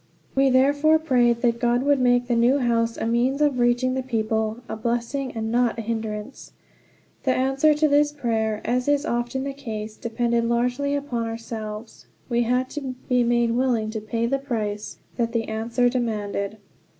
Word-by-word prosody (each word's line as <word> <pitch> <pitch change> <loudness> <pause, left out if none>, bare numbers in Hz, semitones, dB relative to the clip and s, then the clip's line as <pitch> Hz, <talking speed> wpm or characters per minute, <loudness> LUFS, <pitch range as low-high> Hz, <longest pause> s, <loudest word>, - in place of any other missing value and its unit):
We 270 0 +3
therefore 285 +4 +4
prayed 245 -6 +2
that 235 -1 +2
God 240 +1 +2
would 285 -1 +3
make 245 -1 +3
the 240 -1 0
new 240 +4 +4
house 230 -3 +1
a - - -2
means 240 +4 +1
of 290 -4 +2
reaching 245 +1 +2
the 260 - -1
people 220 -3 -1
a - - -4
blessing, 240 +4 -2
and 225 -1 -3
not 240 -1 +2
a 225 - -4
hindrance. 220 +1 -5 0.7
The 260 -2 +1
answer 270 +4 +3
to 305 +1 +3
this 295 0 +3
prayer, 225 -6 -1
as 250 +2 0
is 290 +1 +2
often 240 0 -2
the 275 0 -3
case, 220 -6 -6
depended 235 0 -1
largely 250 +4 0
upon 245 -5 -2
ourselves. 225 -1 -7 0.2
We 240 -1 +2
had 250 +2 +1
to 270 -4 -5
be 250 -2 +3
made 240 0 +2
willing 235 -3 +1
to 220 -1 -4
pay 230 +2 -2
the 275 +4 0
price 215 -6 -4 0.2
that 230 -1 -1
the 230 -1 +1
answer 230 +3 0
demanded. 215 -4 -2
240 Hz, 175 wpm, -24 LUFS, 230-265 Hz, 0.7 s, therefore